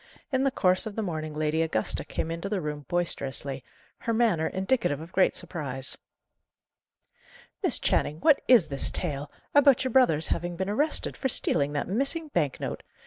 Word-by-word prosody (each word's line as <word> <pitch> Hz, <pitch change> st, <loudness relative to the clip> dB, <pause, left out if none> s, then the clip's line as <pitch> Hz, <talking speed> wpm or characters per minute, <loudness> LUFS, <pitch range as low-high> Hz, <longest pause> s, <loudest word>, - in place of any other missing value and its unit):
In 265 Hz, -1 st, +1 dB
the 275 Hz, -, +3 dB
course 185 Hz, -5 st, +1 dB
of 210 Hz, -, -7 dB
the 220 Hz, -, -2 dB
morning 155 Hz, -4 st, -4 dB
Lady 155 Hz, +1 st, 0 dB
Augusta 135 Hz, -10 st, -1 dB
came 165 Hz, -, -4 dB
into 170 Hz, +4 st, -4 dB
the 205 Hz, -2 st, -1 dB
room 150 Hz, -3 st, -5 dB
boisterously, 140 Hz, -6 st, -1 dB, 0.4 s
her 230 Hz, -, -2 dB
manner 215 Hz, -9 st, +2 dB
indicative 190 Hz, -, 0 dB
of 165 Hz, +3 st, -10 dB
great 190 Hz, -, +3 dB
surprise. 140 Hz, -7 st, -4 dB, 1.7 s
"Miss -, -, +4 dB
Channing, 150 Hz, +2 st, 0 dB
what 300 Hz, -3 st, +5 dB
is 225 Hz, -11 st, +6 dB
this 140 Hz, -1 st, -1 dB
tale, 145 Hz, -4 st, -4 dB, 0.2 s
about 280 Hz, -3 st, +5 dB
your 260 Hz, -, -2 dB
brother's 190 Hz, -, +3 dB
having 175 Hz, 0 st, -2 dB
been 190 Hz, +3 st, -2 dB
arrested 295 Hz, +8 st, +1 dB
for 265 Hz, -, -2 dB
stealing 145 Hz, -, +1 dB
that 145 Hz, -, -2 dB
missing 275 Hz, -, -1 dB
bank 150 Hz, -, -1 dB
note? -, -, -4 dB
175 Hz, 170 wpm, -27 LUFS, 150-230 Hz, 1.7 s, is